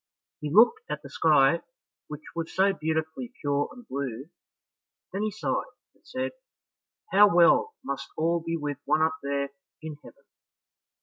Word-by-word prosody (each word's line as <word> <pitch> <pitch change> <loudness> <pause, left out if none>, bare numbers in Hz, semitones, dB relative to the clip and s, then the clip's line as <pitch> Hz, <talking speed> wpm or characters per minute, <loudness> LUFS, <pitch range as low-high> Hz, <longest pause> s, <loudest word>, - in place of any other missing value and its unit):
He 150 - -4
looked 240 - +6
at - - -4
the - - -11
sky, 150 0 +4 0.5
which 150 0 -8
was 165 -1 -3
so 195 +1 +4
beautifully 160 +8 -3
pure 145 -1 0
and 245 -2 -13
blue, 135 +2 -5 0.8
then 195 - -2
he 215 - +1
sighed, 210 +1 -1 0.3
and - - -33
said, 260 0 -3 0.8
"How 205 +1 +7
well 175 - +5
must 140 - -4
all 170 +2 +2
be 165 0 -3
with 145 -3 -4
one 155 - +3
up 160 0 +2
there 140 0 -1 0.3
in 155 -2 -6
heaven!" 140 - -15
160 Hz, 150 wpm, -27 LUFS, 145-195 Hz, 0.8 s, How